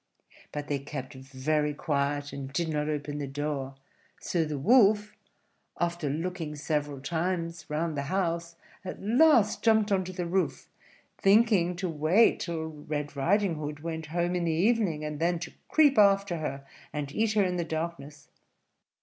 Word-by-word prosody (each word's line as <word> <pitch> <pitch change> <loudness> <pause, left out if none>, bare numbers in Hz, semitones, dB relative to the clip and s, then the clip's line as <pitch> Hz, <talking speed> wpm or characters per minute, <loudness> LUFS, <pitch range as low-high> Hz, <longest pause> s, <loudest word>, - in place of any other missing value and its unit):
But 145 0 -5
they 145 -1 -1
kept 140 -1 -7 0.3
quite 150 0 +1
quiet, 145 -1 -1
and 135 -1 -6
did 165 +3 -1
not 150 -1 -1
open 145 -1 -3
the 140 - -3
door; 140 -1 -3 0.4
so 170 -2 0
the 150 -2 -3
Wolf, 210 - +4 0.7
after 170 -3 -1
looking 160 0 -3
several 145 -1 -2
times 165 +2 -3
round 155 +1 -1
the 140 - -1
house, 170 -3 -1 0.3
at 185 - -6
last 230 -1 +4
jumped 220 -2 +3
on 190 -1 +2
to 185 - -6
the 180 -1 -4
roof, 185 +2 -1 0.5
thinking 195 -4 +4
to 185 +2 -3
wait 165 +7 +3
till 165 -2 -3
Red 150 -1 -5
Riding 175 +4 +1
Hood 150 -1 -5
went 160 -1 -5
home 175 +2 -1
in 175 - 0
the 165 - +1
evening, 175 -3 +1
and 150 -1 -5
then 170 +1 +1
to 165 - -7 0.2
creep 290 -6 +5
after 200 -3 +4
her 135 -3 -4 0.3
and 145 -2 -4
eat 215 +6 +1
her 210 -2 +3
in 180 -1 -1
the 170 - 0
darkness. 160 -3 -5
165 Hz, 165 wpm, -28 LUFS, 150-185 Hz, 0.7 s, creep